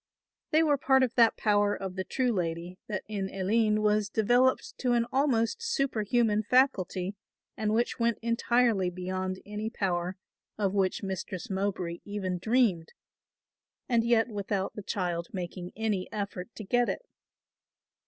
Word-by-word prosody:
They 315 +1 +4
were 290 -3 +2
part 265 0 +4
of 250 -2 0
that 230 -3 +4
power 205 -1 +2
of 190 -2 -5
the 190 - -2
true 250 +4 0
lady 175 -2 -3
that 210 -3 -3
in 200 -3 -3
Aline 215 +2 +1
was 210 -1 +2
developed 250 - +2
to 250 -2 +1
an 235 -1 +2
almost 265 - +1
superhuman 240 - +1
faculty 200 -6 +2 0.4
and 215 -1 -1
which 235 +3 0
went 235 -1 +2
entirely 230 -4 +2
beyond 185 +1 -3
any 210 +1 -4
power 185 -4 -2 0.4
of 200 -2 0
which 195 0 0
Mistress 190 0 -4
Mowbray 190 -3 -2
even 190 -3 -3
dreamed 215 -6 +1 0.9
and 235 -3 +3
yet 230 -1 +3
without 200 -3 -2
the 210 - -6
child 175 -4 -2
making 180 -1 -5
any 210 -4 -2
effort 200 -2 -4
to 215 - -7
get 245 +4 +2
it. - - -3
210 Hz, 145 wpm, -29 LUFS, 190-235 Hz, 0.9 s, They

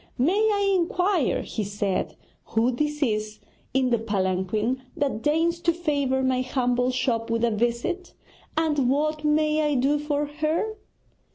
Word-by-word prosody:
'May 285 +9 +3 0.2
I 400 -1 +2
inquire,' 360 -2 +1
he 220 - -3
said, 200 -1 -2 0.3
'who 230 +3 +1
this 300 +4 -1
is 215 -3 -1 0.3
in 260 -1 +1
the 235 - +3
palanquin 210 +3 -1 0.2
that 275 -6 -1
deigns 325 +4 +1
to 340 - +2
favour 285 -6 0
my 260 -1 +2
humble 250 -1 0
shop 240 -3 -1
with 230 0 0
a 235 - +3
visit? 240 - -1 0.4
And 295 -5 +2
what 305 +3 0
may 305 0 +2
I 295 -1 +1
do 275 +3 +2
for 295 0 -1
her?' 310 +8 -1
270 Hz, 150 wpm, -25 LUFS, 235-305 Hz, 0.4 s, May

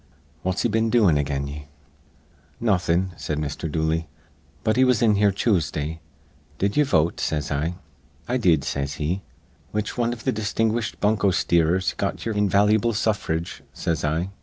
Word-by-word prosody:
What's 95 0 -1
he - - +3
been 110 0 +1
doin' 110 -9 +4
again 70 -1 -1
ye?" 75 +1 -7 0.9
"Nawthin'," 95 -4 +1
said 75 - -3
Mr. 75 +1 -3
Dooley, 80 +1 0 0.6
"but 110 - +2
he 130 - +4
was 125 -3 +3
in 110 -2 +5
here 100 0 +3
Choosday. 80 -6 0 0.6
'Did 100 +3 0
ye 150 - +5
vote?' 85 - +2
says 75 -2 -1
I. 75 +5 -1 0.5
'I 125 - +1
did,' 85 - +3
says 70 0 -2
he. 85 +6 -2 0.5
'Which 105 +3 -3
wan 120 0 +2
iv 120 -1 -7
th' 130 - +1
distinguished 110 +1 -1
bunko 105 -1 +3
steerers 85 0 +2
got 100 - -2
ye'er 115 - -1
invalu'ble 105 +2 +3
suffrage?' 95 -7 -1
says 80 -3 -2
I. 80 +5 -1
95 Hz, 160 wpm, -24 LUFS, 80-110 Hz, 0.9 s, in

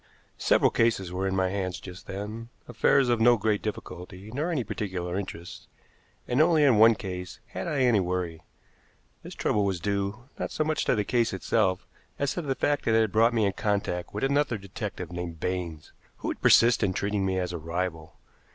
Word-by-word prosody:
Several - - +4
cases 110 -6 +1
were 95 +2 -1
in 95 - -1
my 95 -1 +1
hands 95 -2 -3
just 95 +1 -11
then 105 +4 -6 0.2
affairs 135 -2 +3
of 120 -2 +2
no 120 +1 +6
great 105 0 0
difficulty 95 -1 -7
nor 150 +6 -1
any 155 -8 0
particular 95 -5 -4
interest 90 -3 -6 0.6
and 125 +4 +2
only 160 -1 +4
in 130 -7 +5
one 115 +1 +7
case 90 -3 -6
had - - -5
I 165 - -2
had - - +4
any 120 -4 +4
worry. 90 -3 -2 0.8
This - - -10
trouble 105 - +1
was 95 -3 -1
due, 100 +5 -2 0.2
not - - -2
so 155 - -1
much 155 0 -1
to - - +3
the 105 - +1
case 120 -2 +1
itself 95 -1 0 0.3
as 140 -1 0
to 175 - -3
the 135 -4 -2
fact 145 +2 0
that 110 - +3
it 115 - +5
had 110 -2 +1
brought 115 +3 +4
me 110 -2 +3
in 100 - +1
contact 100 -5 -2
with 105 - -4
another 140 -3 +1
detective 100 -2 -6
named 85 -2 -5
Baines, 85 -3 -4 0.2
who - - -4
would - - -5
persist 120 +1 +6
in 100 -4 +1
treating 100 +1 -1
me 95 -1 0
as 90 -1 -2
a 85 - -4
rival. 85 0 -4
100 Hz, 205 wpm, -27 LUFS, 90-115 Hz, 0.8 s, one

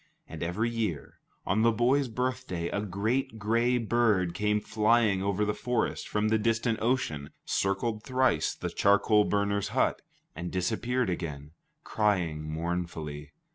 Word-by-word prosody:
And - - -8
every 105 +8 -1
year, 110 -10 -3 0.3
on 110 +3 +1
the 115 +1 +5
boy's 125 +5 +2
birthday, 120 -8 -2
a 100 - -2
great 110 +5 -1
gray 115 +4 +2
bird 110 -6 +2
came 105 +3 +1
flying 110 -2 +2
over 100 +1 0
the 105 - 0
forest 125 +2 -2
from 105 +1 0
the 110 0 +2
distant 115 +1 0
ocean, 115 - -1 0.2
circled 105 +3 0
thrice 130 - +1
the - - -4
charcoal 105 +1 +4
burners' 100 0 0
hut, - - +2 0.3
and 85 +1 -4
disappeared 115 +4 -1
again, 75 -4 -5 0.3
crying 90 -8 0
mournfully. 80 -3 -4
105 Hz, 135 wpm, -29 LUFS, 90-115 Hz, 0.3 s, the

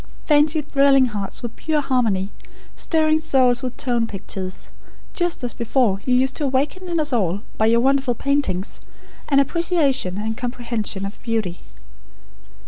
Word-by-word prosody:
Fancy 300 +1 +3
thrilling 275 -2 +4
hearts 210 -1 -4
with 235 - -5
pure 315 -2 0
harmony, 225 -8 0 0.4
stirring 315 -1 +2
souls 260 -6 +3
with 255 -2 -5
tone 240 -4 0
pictures; 190 -2 -6 0.4
just 350 -6 -1
as 245 - -2
before 230 -4 +1
you 250 - +4
used 260 +1 +2
to - - -2
awaken 285 +8 -1
in 340 -1 0
us 300 -3 0
all, 195 -4 0 0.2
by 220 - +4
your 230 +1 +4
wonderful 265 -1 +2
paintings, 250 -10 -1 0.5
an 275 -1 +5
appreciation 280 - +1
and 220 +2 -2
comprehension 235 -5 -3
of 200 - -8
beauty." 220 -7 -2
255 Hz, 145 wpm, -21 LUFS, 220-285 Hz, 0.5 s, an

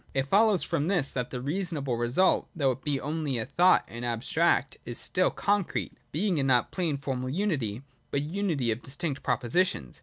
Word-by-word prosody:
(2) 135 - +3
It 135 - -6
follows 210 -1 +4
from 145 - -1
this 175 -8 +1
that 125 -2 -3
the 125 - -4
'reasonable' 145 -2 -2
result, 120 +11 +2
though 140 -5 +2
it 130 +1 -7
be 145 -3 0
only 150 -2 -2
a 110 - -2
thought 175 +7 +4
and 115 +1 -7
abstract, 130 +6 +1
is 120 0 -5
still 185 - +2
a - - 0
concrete, 205 -2 -1 0.2
being 170 -2 0
not 125 -2 +4
a - - -17
plain 165 -6 0
formal 130 -2 -3
unity, 135 - -1 0.3
but 140 - 0
a - - -2
unity 160 - -1
of 110 +2 -3
distinct 140 +2 -4
propositions. 120 - 0
140 Hz, 195 wpm, -28 LUFS, 125-175 Hz, 0.3 s, follows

